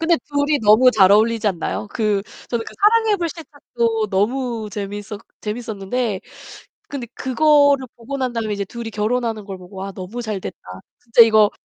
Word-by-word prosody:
근데 330 +1 +3
둘이 285 0 +1
너무 215 +5 +6
잘 195 -4 +5
어울리지 220 +1 +3
않나요? 195 +3 -3
그 210 -3 0 0.3
저는 235 -2 -2
그 - - -10
사랑의 435 +1 +4
불시착도 285 - -2
너무 230 +2 -1
재밌었 205 0 -6 0.2
재밌었는데 215 -1 -3 0.7
근데 275 -4 -5
그거를 285 0 +3
보고 250 +4 -6
난 255 -2 -1
다음에 225 -2 -2
이제 200 - -3
둘이 230 +3 -7
결혼하는 220 0 -1
걸 195 -2 -7
보고 185 +1 -14
'와, 195 +1 -5
너무 195 +7 -6
잘 215 -3 -4
됐다. - - -7 0.4
진짜 235 0 +5
이거 215 -2 +5
230 Hz, 345 characters per minute, -20 LUFS, 205-260 Hz, 0.7 s, 너무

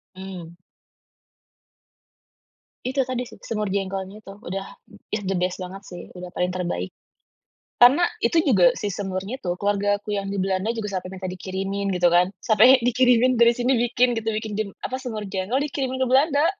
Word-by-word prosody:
Mhm. 185 -3 -8 2.3
Itu 260 +2 -1
tadi 250 -1 -2
sih, - - -14
semur 210 -3 -3
jengkolnya 195 +1 -3
itu. 195 - -11
Udah 195 +2 -4 0.4
ya 210 - -2
the 190 - -1
best 180 0 -1
banget 190 +1 -8
sih. 175 - -8
Udah 180 0 -8
paling 180 0 0
terbaik. 175 - -3 0.9
Karena 280 +9 +7 0.2
itu 240 +8 +2
juga 185 - +5
si 205 - -2
semurnya 195 +6 -4
itu 175 - -2
keluargaku 205 +1 0
yang 195 0 -3
di 200 - -2
Belanda 190 +3 0
juga 225 -3 -4
sampai 185 0 -3
minta 185 - -7
dikirimin, 195 +2 -3
gitu 175 0 +4
kan. 180 +1 +4
Sampai 245 +4 +6
dikirimin 250 0 +4
dari 235 0 +7
sini 250 +2 +2 0.2
bikin 245 0 +3
gitu, 225 0 -2
bikin 215 -1 -3
jim 215 -1 -2 0.2
apa, 260 - -3
semur 220 -5 -5
jengkol 195 +7 -1
dikirimin 265 -2 -3
ke 260 - +1
Belanda. 285 +3 +3
205 Hz, 165 wpm, -23 LUFS, 190-245 Hz, 2.3 s, Karena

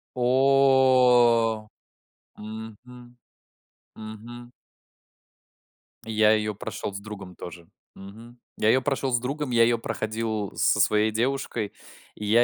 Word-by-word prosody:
О! 125 -4 +3 0.7
Мгм 115 +3 -11 0.8
мгм. 115 +3 -10 1.6
И 110 - -6
я 110 0 +4
её 105 -1 0
прошел 100 - -6
с 100 - -6
другом 100 -4 -10
тоже. 85 -1 -10 0.3
Мгм. 115 +5 -13 0.2
Я 110 - +2
ее 130 +3 +4
прошел 135 -1 -2
с 120 - +2
другом, 140 +2 -4
я 115 -1 +4
ее 120 0 +2
проходил 110 -2 -4
со 105 - +2
своей 105 +1 +2
девушкой 120 -2 -2 0.4
и 105 - -7
я 115 +3 +4
115 Hz, 115 wpm, -25 LUFS, 105-125 Hz, 1.6 s, я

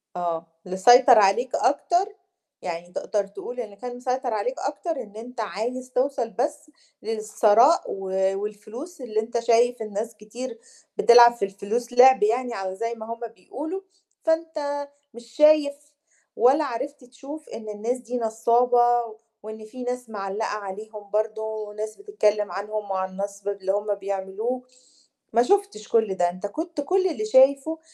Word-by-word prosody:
آه، 170 -2 -3 0.2
مسيطر 245 +6 +7
عليك 215 +5 +3
أكتر، 390 +4 +1 0.5
يعني 175 0 -6
تقدر 205 +2 -2
تقول 245 +5 -8
اللي 215 -4 -6
كان 245 +3 -7
مسيطر 250 -1 -2
عليك 215 +5 -2
أكتر 290 +4 -3
إن 210 -1 -16
أنت 235 +2 -7
عايز 240 +6 -4
توصل 255 -2 0
بس 295 +6 -3 0.3
للثراء، 220 +6 +4
و 195 -1 -5 0.3
والفلوس 215 - -8
اللي 220 -3 -2
أنت 230 +2 -2
شايف 235 +1 +3
إن 215 -1 -6
ناس 220 +2 -4
كتير 230 +3 -8 0.4
بتلعب 240 - +8
في 235 -4 -2
الفلوس 215 +5 -4
لِعْب 260 -1 +7
يعني 235 0 0
أو 190 -1 -3
زَي 230 +4 -3
ما 220 -1 -9
هُم 230 - -11 0.2
بيقولوا، 310 - -6 0.4
فأنت 310 -3 -1 0.3
مش 235 +1 -12
شايف 300 -1 +5 0.6
ولا 265 +6 +4
عرفت 270 +2 -5
تشوف 275 +5 -11
إن 220 -1 -8
الناس 220 +4 -2
دي 250 0 -5
نصّابة، 240 +1 +2 0.3
وإن 215 0 -9
فيه 250 +3 -9
ناس 250 -1 -4
مِعلَّقة 205 0 -3
عليهم 210 +1 -8
برضه، 215 +1 -1
وناس 215 0 -5
بتتكلم 210 - 0
عنهم 205 +2 -4
وعن 190 0 -1
النصب 200 +1 -6
اللي 195 -1 -2
هُم 205 +1 -1
بيعملوه، 200 +5 -3 0.7
ما 235 - +5
شُفتش 395 - +1
كُلّ 225 -4 +2
ده، 175 -1 +2
أنت 185 +3 -7
كنت 320 +7 -4
كُلّ 375 +6 +2
اللي 370 +5 -3
شايفُه 280 -2 +4
230 Hz, 150 wpm, -24 LUFS, 210-260 Hz, 0.7 s, بتلعب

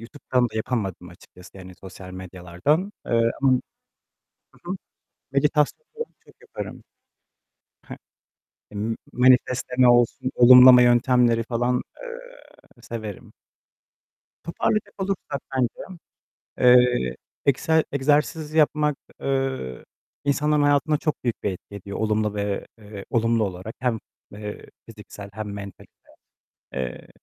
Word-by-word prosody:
YouTube'dan 125 +1 -1
da - - -17
yapamadım 105 -6 -3
açıkçası, 90 +1 -16
yani, 95 -1 -11
sosyal 95 0 -11
medyalardan, 95 - -2
eee, 115 0 +2
ama 130 -2 +4 1.0
Hı 175 - -7
hı, 190 - -2 0.6
meditasyonları 150 - 0 0.2
çok - - -22
yaparım. - - -8 1.1
I - - -4 0.6
hı. 105 - -14
M 110 +2 -2 0.2
manifestleme 125 0 +3
olsun, 120 +1 +3
olumlama 125 0 +9
yöntemleri 120 -1 +4
falan, 120 +2 -1 0.2
eee, - - -13
severim. 110 -4 -8 1.1
Toparlayacak 205 +5 -1
olursak 185 -8 -3 0.2
bence, 130 +8 -3 0.6
eee, 125 - +4 0.3
egse 155 +4 +2
egzersiz 150 +2 0
yapmak, 150 -2 +2 0.2
eee, 135 - -2 0.4
insanların 150 +1 +2
hayatına 145 +1 +3
çok 155 -3 -3
büyük 120 - -2
bir 105 - 0
etki 95 +2 -12
ediyor 100 0 -7
olumlu 105 -1 0
ve, 100 -1 -3
eee, 105 -2 -10
olumlu 115 -1 +2
olarak 95 +3 -6
hem, 125 -3 0 0.3
eee, 105 0 -8 0.2
fiziksel 100 -1 -11
hem 110 +1 -6
mentalite. 100 -2 -9 0.8
Eee 65 -2 -5
125 Hz, 110 wpm, -24 LUFS, 105-145 Hz, 1.1 s, olumlama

